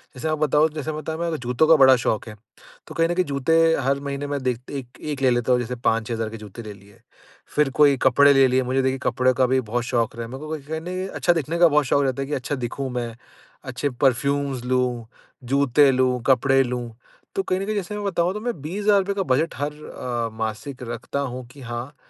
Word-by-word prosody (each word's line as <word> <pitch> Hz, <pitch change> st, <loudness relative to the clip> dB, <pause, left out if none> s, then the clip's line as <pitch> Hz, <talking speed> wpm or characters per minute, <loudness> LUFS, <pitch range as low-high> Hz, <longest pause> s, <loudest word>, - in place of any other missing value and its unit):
जैसे 145 Hz, +5 st, -4 dB
आप 155 Hz, 0 st, 0 dB
बताओ 155 Hz, +1 st, +3 dB
जैसे 155 Hz, 0 st, -4 dB
बताया 155 Hz, +1 st, -5 dB
मैं 170 Hz, -1 st, -1 dB
जूतों 125 Hz, +5 st, +1 dB
का 165 Hz, -, +7 dB
बड़ा 130 Hz, -1 st, +7 dB
शौक़ 115 Hz, -2 st, -1 dB
है, 105 Hz, -, -9 dB, 0.5 s
तो -, -, -10 dB
कहीं 165 Hz, 0 st, +3 dB
न -, -, +1 dB
कहीं 185 Hz, -, +2 dB
जूते 140 Hz, +2 st, 0 dB, 0.3 s
हर 135 Hz, +1 st, +1 dB
महीने 140 Hz, 0 st, -4 dB
मैं 145 Hz, -1 st, -3 dB
दे 125 Hz, -2 st, +1 dB, 0.2 s
1- 125 Hz, -1 st, -10 dB
1 145 Hz, -3 st, -4 dB
ले 130 Hz, -, +4 dB
लेता 120 Hz, +1 st, +1 dB
हूँ 125 Hz, -, +4 dB
जैसे 125 Hz, +1 st, -4 dB
5,000-6,000 115 Hz, -1 st, -1 dB
के 115 Hz, -, -8 dB
जूते 105 Hz, +2 st, -10 dB
ले 105 Hz, -1 st, -8 dB
लिए, 100 Hz, 0 st, -19 dB, 0.6 s
फिर 150 Hz, -2 st, +3 dB
कोई 145 Hz, -2 st, +6 dB
कपड़े 140 Hz, +2 st, +6 dB
ले 135 Hz, -1 st, +5 dB
लिए, 130 Hz, +1 st, +2 dB
मुझे 130 Hz, +2 st, 0 dB
देखिए 130 Hz, 0 st, 0 dB
कपड़े 130 Hz, 0 st, +2 dB
का 130 Hz, -, +4 dB
भी 130 Hz, +1 st, +2 dB
बहुत 120 Hz, +1 st, -2 dB
शौक़ 115 Hz, -2 st, -1 dB
रहा 115 Hz, -, -4 dB
है, 115 Hz, -, -10 dB
मेरे 130 Hz, -, -7 dB
को 155 Hz, -, -7 dB
बस 145 Hz, -1 st, -11 dB
ऐसा 160 Hz, 0 st, -2 dB
नहीं 185 Hz, +2 st, -4 dB
अच्छा 175 Hz, -, +1 dB
दिखने 165 Hz, +1 st, -2 dB
का 175 Hz, -, +7 dB
बहुत 150 Hz, -2 st, +2 dB
शौक़ 140 Hz, +2 st, +2 dB
रहता 135 Hz, +1 st, -1 dB
है 135 Hz, -, -3 dB
कि 150 Hz, -, -4 dB
अच्छा 135 Hz, +2 st, -3 dB
दिखूँ 130 Hz, +2 st, -4 dB
मैं, 120 Hz, -2 st, -4 dB, 0.5 s
अच्छे 135 Hz, +2 st, -3 dB
परफ़्यूम्स 140 Hz, 0 st, +1 dB
लूँ, 125 Hz, -2 st, 0 dB, 0.4 s
जूते 140 Hz, +2 st, +3 dB
लूँ, 125 Hz, -1 st, +1 dB
कपडे 135 Hz, +1 st, +4 dB
लूँ 125 Hz, -1 st, -4 dB, 0.4 s
तो 195 Hz, -, 0 dB
कहीं 185 Hz, 0 st, -1 dB
न 195 Hz, -, -3 dB
कहीं 215 Hz, -, -2 dB
जैसे 205 Hz, 0 st, -3 dB
मैं 210 Hz, -, -4 dB
बताऊँ 175 Hz, -1 st, 0 dB
तो 210 Hz, -, -4 dB
मैं 235 Hz, -, -4 dB
₹20,000 200 Hz, +4 st, +1 dB
का 195 Hz, -, 0 dB
बजट 160 Hz, +4 st, 0 dB
हर 145 Hz, +1 st, -2 dB
अ, 120 Hz, -6 st, -4 dB
मासिक 115 Hz, +4 st, -5 dB
रखता 120 Hz, +4 st, -4 dB
हूँ 130 Hz, -2 st, -4 dB
कि 140 Hz, -, -14 dB
हाँ, 120 Hz, +3 st, -6 dB
135 Hz, 235 wpm, -23 LUFS, 125-150 Hz, 0.6 s, का